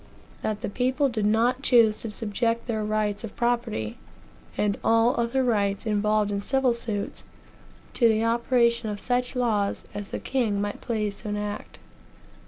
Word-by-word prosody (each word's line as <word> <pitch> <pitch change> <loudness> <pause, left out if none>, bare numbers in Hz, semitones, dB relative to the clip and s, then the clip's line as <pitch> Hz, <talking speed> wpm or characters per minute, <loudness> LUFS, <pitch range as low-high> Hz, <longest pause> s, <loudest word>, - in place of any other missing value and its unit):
that 210 -1 -2
the - - -2
people 260 +6 +1
did 215 -4 0
not 235 +4 +2
choose 230 -5 +4
to 225 - -4
subject 230 +2 -1
their 220 -3 -2
rights 210 0 -1
of 225 - -7
property, 235 - -1 0.6
and 205 -1 0
all 230 +2 +4
other 235 +3 +1
rights 205 -4 +1
involved 210 -1 +1
in 200 0 -1
civil 265 +2 +2
suits, 220 -3 -4 0.7
to 235 - +4
the 220 0 +2
operation 235 0 +2
of 205 -1 -4
such 250 +2 -1
laws 215 -5 0
as 205 -1 -6
the - - -3
king 230 -7 0
might 205 0 -3
please 210 -3 -2
to 215 - -6
enact. 205 0 -4
225 Hz, 160 wpm, -26 LUFS, 210-240 Hz, 0.7 s, choose